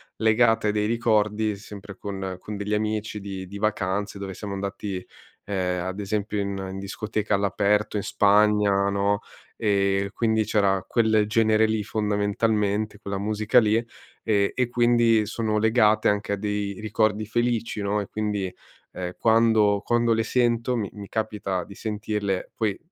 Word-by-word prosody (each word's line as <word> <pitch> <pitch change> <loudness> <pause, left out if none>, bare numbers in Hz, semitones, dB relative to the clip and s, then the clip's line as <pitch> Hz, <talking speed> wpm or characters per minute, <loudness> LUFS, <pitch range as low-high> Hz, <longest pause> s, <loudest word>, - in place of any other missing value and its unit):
legate 110 0 +3
a - - +3
dei 105 0 0
ricordi, 110 -2 +1
sempre 100 -1 -10
con 95 -2 -5
con 105 +2 -7
degli 105 +1 -3
amici, 105 0 -1
di 95 -2 -6
di 100 +2 -8
vacanze 100 -1 -1
dove 100 -1 -6
siamo 100 +2 -6
andati, 100 -1 -4 0.4
ehm, 90 -3 -2
ad 95 +2 -4
esempio 105 +1 -2
in 100 0 -2 0.2
in 95 - -6
discoteca 105 +1 -2
all'aperto, 105 +2 +1
in 100 - -2
Spagna, 105 -1 +3
no, 100 +1 +1 0.4
e 100 -2 +1
quindi 110 -1 +1
c'era 100 -3 +2
quel 110 -2 +3
genere 110 0 +3
lì, 110 -1 -1
fondamentalmente, 105 0 0
quella 100 -1 -4
musica 105 +3 +2
lì 110 -2 +2 0.5
e 100 -3 +2
e 125 -2 +1
quindi 120 -2 +3
sono 110 0 -1
legate 110 -1 +3
anche 105 0 -1
a - - +2
dei 105 -1 -3
ricordi 110 0 0
felici, 115 -1 -1
no, 100 +1 0
e 100 - -6
quindi, 105 -3 -2 0.4
ehm, 90 -1 -5
quando 110 -3 +3
quando 120 0 +2
le 115 0 +1
sento 120 0 +1
mi 105 -5 -2
mi 100 -1 -9
capita 105 -4 -2
di 100 - -12
sentirle, 105 -2 -3
poi 110 -3 -1
105 Hz, 155 wpm, -25 LUFS, 100-110 Hz, 0.5 s, legate